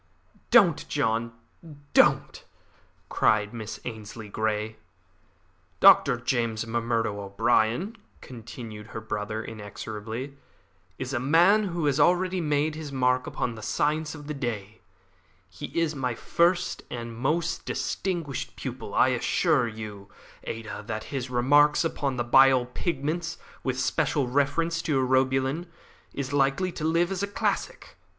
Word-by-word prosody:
"Don't, - - +5
John, 115 +1 0 0.6
don't!" - - +3 0.6
cried 105 0 +2
Miss 110 -2 -6
Ainslie 110 -2 -7
Grey. 110 +1 -2 1.0
"Dr. 125 - +7
James 115 -3 -1
M'Murdo 115 -2 -1
O'Brien," 115 - +1 0.2
continued 115 -3 -9
her 115 - -6
brother 110 0 -4
inexorably, 110 +4 -7 0.6
"is 130 +1 -4
a 120 - 0
man 175 - +4
who 170 -4 -2
has 145 0 +1
already 180 +4 +3
made 150 0 +1
his 155 -2 -7
mark 125 -1 +1
upon 120 - -2
the 110 - -10
science 150 +6 -1
of 150 -1 -10
the 150 - -4
day. 110 -6 -5 0.7
He 90 -3 -8
is 165 -2 +1
my 125 -4 -2
first 170 +8 +1
and 115 -1 -6
my - - -10
most 165 +4 0
distinguished 170 -8 -3
pupil. - - -6
I - - +5
assure 120 - +2
you, 105 -3 -8 0.4
Ada, 110 -2 -6
that 110 -1 -3
his 130 -2 -3
'Remarks 145 +5 +4
upon 140 -4 -1
the 120 - 0
Bile 130 +1 +5
Pigments, 165 +5 -3 0.3
with 130 -1 -1
special 135 +1 +1
reference 145 +6 +1
to 150 -5 0
Urobilin,' 130 +5 +1 0.4
is 140 0 -4
likely 145 +7 +2
to 165 - -7
live 170 +3 +2
as 190 -1 -2
a 200 - 0
classic. 200 - -3
130 Hz, 130 wpm, -27 LUFS, 115-150 Hz, 1.0 s, Dr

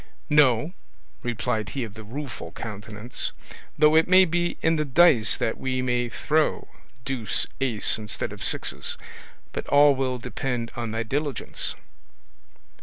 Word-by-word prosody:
"No," 150 +1 +4 0.5
replied 115 -3 -2
he 130 - 0
of 110 -3 -7
the 110 0 -10
Rueful 130 +2 -7
Countenance; 105 +2 -5 0.4
"though 150 +1 +5
it 160 0 +5
may 185 +1 +7
be 175 0 -1
in 165 +1 +3
the 155 - +1
dice 140 -5 +4
that 110 - -2
we 130 -1 -2
may 125 -1 0
throw 155 +6 0 0.4
deuce 125 -7 0 0.2
ace 115 -5 +3
instead 105 -2 -4
of - - -11
sixes; - - +2 0.6
but - - -5
all 145 0 +6
will 130 -1 -1
depend 125 -1 -4
on 120 -1 -4
thy 115 +1 -2
diligence." 145 +4 -2
125 Hz, 140 wpm, -25 LUFS, 115-150 Hz, 0.6 s, may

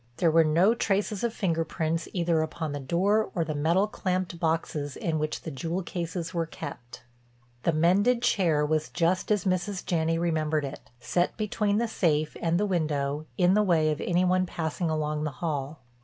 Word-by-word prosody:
There 170 -2 +3
were 165 +1 +6
no 170 +8 +4
traces 205 -2 -1
of 235 - +1
finger 170 -7 0
prints 160 0 -2
either 170 -3 +1
upon 160 0 -3
the 145 - -4
door 190 +10 +1
or 170 -3 +1
the 155 - -3
metal 165 +7 +2
clamped 185 -4 -2
boxes 160 -3 -1
in 160 -2 -1
which 155 0 -3
the 160 - -5
jewel 165 +6 -3
cases 170 0 -4
were 165 -2 -1
kept. 120 -5 -9 0.6
The 170 - +2
mended 200 +10 +3
chair 165 -10 +2
was 155 0 0
just 175 +4 0
as 210 -3 +1
Mrs. 185 +1 -1
Janney 165 -1 +1
remembered 155 -3 0
it, 130 -4 -9
set 175 +6 0
between 210 -1 0
the 235 +1 +1
safe 155 -8 0
and 170 +1 +1
the 210 - +2
window, 150 -5 -1
in 180 0 +4
the 210 - +4
way 165 -6 +3
of 150 - -3
any 180 +1 +2
one 185 0 +2
passing 165 +1 -2
along 150 -1 -1
the 155 -2 -3
hall. 150 -3 -3
165 Hz, 185 wpm, -27 LUFS, 155-185 Hz, 0.6 s, were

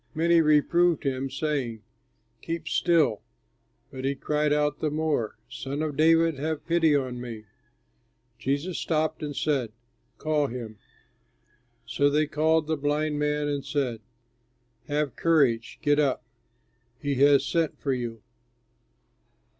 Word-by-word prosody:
Many 165 +1 +4
reproved 160 +2 +3
him, 135 0 -2
saying, 135 -5 -3 0.6
"Keep 165 -1 -5
still," 160 -11 +2 0.7
but 130 -2 -7
he 135 +1 0
cried 150 +2 0
out 150 0 +1
the 155 - 0
more, 150 -7 -1
"Son 135 +5 -4
of 150 -2 -3
David, 165 -1 +3
have 155 +1 -3
pity 165 -3 +3
on 130 -3 -2
me!" 115 -3 -7 0.9
Jesus 145 +8 -2
stopped 155 0 -1
and 145 -2 -4
said, 135 -8 0 0.5
"Call 155 -2 0
him." 115 -4 -7 1.1
So 140 +4 +2
they 150 +2 +2
called 155 +1 +1
the 160 0 -1
blind 150 +1 -1
man 150 0 0
and 145 -1 -2
said, 135 -5 -2 0.9
"Have 145 -3 -1
courage! 140 -9 +2
Get 145 0 +3
up, 140 -4 +1 0.8
he 145 -1 -1
has 140 -1 +5
sent 165 -1 -1
for 140 - -1
you." 115 -3 -5
145 Hz, 130 wpm, -26 LUFS, 135-155 Hz, 1.1 s, has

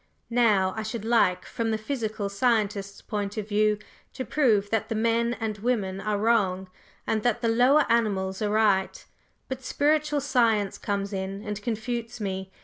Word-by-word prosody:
Now, 210 -6 +3
I 220 - -3
should 220 0 -5
like, 220 -6 +2
from 230 -1 -3
the 220 - 0
physical 220 -3 -3
scientist's 200 -2 0
point 205 -1 -4
of 210 -1 -3
view, 210 0 +2 0.4
to 260 - -5
prove 215 -6 +2
that 225 -2 0
the 225 - -1
men 230 +2 +1
and 215 -2 -3
women 200 -5 -1
are 210 0 -1
wrong, 200 -4 +1 0.4
and 220 - 0
that 240 +1 0
the 235 - +1
lower 250 +6 +4
animals 200 -5 0
are 210 - +1
right; 205 -3 +1 0.4
but 260 0 -5
spiritual 295 +1 +1
science 225 -7 +1
comes 200 0 -2
in 195 +1 -4
and 210 -1 -5
confutes 235 +1 -4
me. 190 -2 -4
215 Hz, 165 wpm, -26 LUFS, 200-235 Hz, 0.4 s, lower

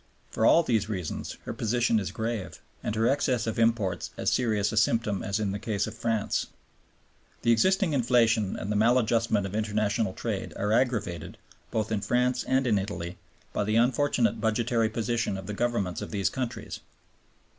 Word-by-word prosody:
For 110 - +2
all 170 - +6
these 110 -6 0
reasons 90 -7 -4
her - - -5
position 115 0 +1
is 95 - -3
grave, 110 -3 -4 0.2
and 105 - -3
her 110 +1 +2
excess 130 -3 +1
of 115 0 -2
imports 110 -6 +1
as - - 0
serious 105 -5 +1
a 110 - -4
symptom 110 -2 +2
as 100 +2 -1
in 105 -2 -1
the 100 - -3
case 105 -2 -1
of 110 - -6
France. 115 -2 -1 1.0
The 115 - +4
existing 185 - +3
inflation 115 -5 +2
and 100 - -4
the - - 0
maladjustment 115 -2 +2
of 95 - -6
international 105 -1 0
trade - - -4
are 105 +1 -1
aggravated, 105 -7 -1 0.3
both 110 -1 -2
in 105 -2 0
France 125 +2 +1
and 130 0 +2
in 110 -5 +3
Italy, 90 -3 -5 0.3
by 105 - 0
the 110 +1 0
unfortunate 120 0 +2
budgetary 115 +1 +1
position 115 -2 -1
of 95 - -7
the 105 - -5
Governments 105 -5 -1
of - - -5
these 100 -3 0
countries. 120 -4 -4
110 Hz, 175 wpm, -27 LUFS, 105-120 Hz, 1.0 s, all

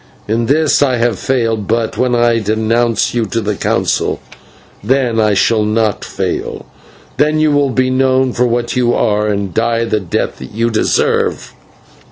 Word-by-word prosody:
In 115 +2 0
this 155 +1 +2
I 135 -3 +2
have 120 -4 0
failed, 115 -6 -1
but 115 0 -1
when 125 -1 +1
I 120 -1 +2
denounce 110 +2 0
you 120 -2 0
to 115 - -2
the 105 -1 -2
Council, - - -1 0.6
then 125 0 +1
I 105 -2 +2
shall 110 +2 +2
not 110 -1 0
fail; - - -4 0.5
then 155 +1 +2
you 155 -1 +3
will 145 -1 +2
be 130 0 0
known 130 -1 +2
for 125 +1 +1
what 120 +1 -1
you 120 -1 +2
are, 105 -2 +1
and 100 -3 -2
die 115 +1 0
the 110 -2 0
death 90 -4 -3
that 65 +8 -10
you 115 +1 0
deserve." 110 - 0
115 Hz, 170 wpm, -15 LUFS, 110-125 Hz, 0.6 s, you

